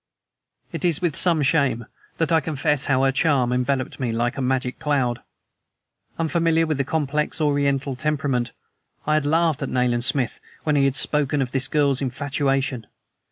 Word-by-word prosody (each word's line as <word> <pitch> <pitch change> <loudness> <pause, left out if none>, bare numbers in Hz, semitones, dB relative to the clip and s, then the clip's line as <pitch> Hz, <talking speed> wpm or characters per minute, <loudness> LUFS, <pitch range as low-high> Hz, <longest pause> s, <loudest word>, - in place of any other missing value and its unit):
It - - -5
is 170 -4 +2
with 170 -5 -1
some 165 -4 +3
shame 135 -6 +1 0.3
that 165 0 0
I 165 - +5
confess 150 -1 0
how 135 -1 +2
her 135 - +3
charm 135 -3 +2
enveloped 130 +1 -1
me 125 -4 -1
like 120 +1 -1
a 135 - -4
magic 130 -1 -1
cloud. 135 -6 0 1.0
Unfamiliar 165 0 +1
with 155 -3 -2
the - - +2
complex 150 +1 -1
Oriental 140 -2 0
temperament, 140 -4 -1 0.6
I 155 - +1
had 155 -2 +1
laughed 160 -1 +2
at 135 - -2
Nayland 125 -1 +1
Smith 130 -1 0 0.2
when 150 -1 +1
he 140 -1 +3
had 135 -1 +1
spoken 145 -1 +1
of 130 -2 -1
this 135 -1 0
girl's 140 -3 +1
infatuation. 135 -2 -1
140 Hz, 165 wpm, -23 LUFS, 130-150 Hz, 1.0 s, I